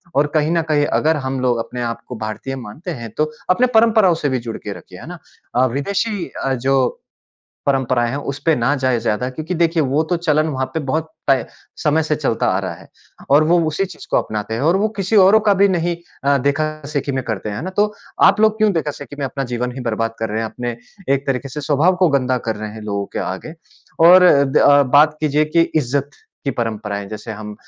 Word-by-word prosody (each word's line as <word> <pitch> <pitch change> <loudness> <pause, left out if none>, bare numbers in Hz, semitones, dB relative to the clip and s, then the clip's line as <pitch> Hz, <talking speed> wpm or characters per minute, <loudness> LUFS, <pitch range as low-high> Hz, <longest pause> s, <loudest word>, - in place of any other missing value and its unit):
और 145 +1 +3
कहीं 155 +1 +2
न 170 -1 +2
कहीं 145 -1 +3
अगर 155 +2 +1
हम 130 0 -2
लोग 125 -2 +1
अपने 125 0 -6
आप 115 -1 -4
को 125 - -6
भारतीय 110 +5 -5
मानते 130 - -7
हैं, 115 -7 -6
तो 155 0 0 0.2
अपने 240 +8 +4
परंपराओं 220 -6 +5
से - - +3
भी 130 -1 0
जुड़ 110 - -4
के - - -6
रखिए। - - -14
है - - -11
ना? - - -8 0.4
अ, 125 +1 +4
विदेशी 195 - -2 0.2
अ, 135 - +1
जो 130 0 0 0.7
परंपराएँ 130 -3 +1
हैं, 135 - -3
उसपे 145 +3 -1
ना 125 +4 +1
जाएँ 130 -2 +1
ज़्यादा 120 +5 -1
क्योंकि 155 +7 -5
देखिए, 165 -1 +2
वो 140 +4 +1
तो 175 +2 -1
चलन 155 -2 +1
वहाँ 130 -3 -2
पे 160 - 0
बहुत 155 +3 -2 0.2
तय 135 -1 +3 0.3
समय 155 0 +1
से 155 -1 -1
चलता 135 -7 -1
आ 95 - +1
रहा 95 -3 -4
है - - -16 0.4
और 145 +3 +6
वो 170 +3 +3
उसी 155 +6 -1
चीज़ 180 -3 -10
को - - +2
अपनाते 110 +1 -3
हैं 115 - -3
और 170 +4 +3
वो 210 +3 +1
किसी 195 +2 0
औरों 200 +2 +7
का 200 - +5
भी 200 +1 +4
नहीं 175 -2 0 0.3
अ, 140 0 +4
देखा-देखी 145 0 -2
में 130 - -1
करते 110 -2 -4
हैं। 100 - -5
है - - -5
ना? 185 - -4
तो 210 +2 +1 0.3
आप 210 - +6
लोग 220 0 +4
क्यों 215 -1 +3
देखा-देखी 145 -3 -4
में 140 - -2
अपना 135 +1 -4
जीवन 125 +1 -2
ही 130 - -6
बर्बाद 115 -1 -2
कर 110 - -1
रहे 110 +2 -1
हैं, - - -2
अपने 120 -1 -5 0.4
एक 140 0 -4
तरीके 135 0 -2
से 150 +3 -6
स्वभाव 150 +6 +2
को 180 -1 +3
गंदा 130 -3 +1
कर 110 - -1
रहे 110 0 -6
हैं 110 0 -9
लोगों 100 -1 -3
के - - 0
आगे 95 - -5 0.5
और 180 +1 +8 0.2
द 135 +2 -3
अ, 145 0 +6
बात 145 +3 +4
कीजिए 150 0 +2
कि 155 +2 +1 0.2
इज़्ज़त 140 0 0 0.3
की 140 - 0
परंपराएँ, 105 -4 -3
जैसे 110 +1 -7
हम 105 0 -8
140 Hz, 230 wpm, -19 LUFS, 125-160 Hz, 0.7 s, और